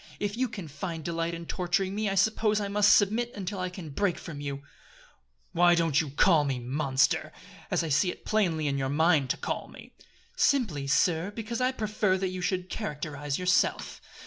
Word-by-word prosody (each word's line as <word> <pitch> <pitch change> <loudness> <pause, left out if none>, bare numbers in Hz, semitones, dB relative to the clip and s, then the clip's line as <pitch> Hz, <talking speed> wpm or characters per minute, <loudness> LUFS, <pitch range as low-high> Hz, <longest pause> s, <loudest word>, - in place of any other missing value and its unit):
If 205 0 -2
you 255 +2 0
can 195 -7 -7
find 155 +3 -6
delight 170 0 -2
in 170 0 -8
torturing 185 +3 -1
me 210 0 -1
I 195 - -1
suppose 215 +1 +2
I 205 - -2
must 205 0 +5
submit 225 +4 +1
until 200 -1 -4
I 185 0 -2
can 180 -4 -9
break 180 +3 0
from 150 -4 -8
you." 140 -1 -5 0.9
"Why 175 0 +5
don't 165 -3 +2
you 155 - -5
call 155 +2 +4
me, 135 -3 -1
Monster! 130 +2 0 0.4
as - - +1
I 165 - -3
see 155 +6 +2
it - - -8
plainly 175 -8 +1
in 140 -1 0
your 135 0 -1
mind 150 -2 +3
to - - 0
call - - -4
me?" - - -14 0.4
"Simply, 195 - +1
sir, 165 +5 +2
because 225 +3 -5
I 255 +1 +2
prefer 215 -5 0
that 190 0 -1
you 185 0 -5
should 180 0 -1
characterize 150 -8 -4
yourself." 180 -1 0
180 Hz, 195 wpm, -28 LUFS, 150-205 Hz, 0.9 s, must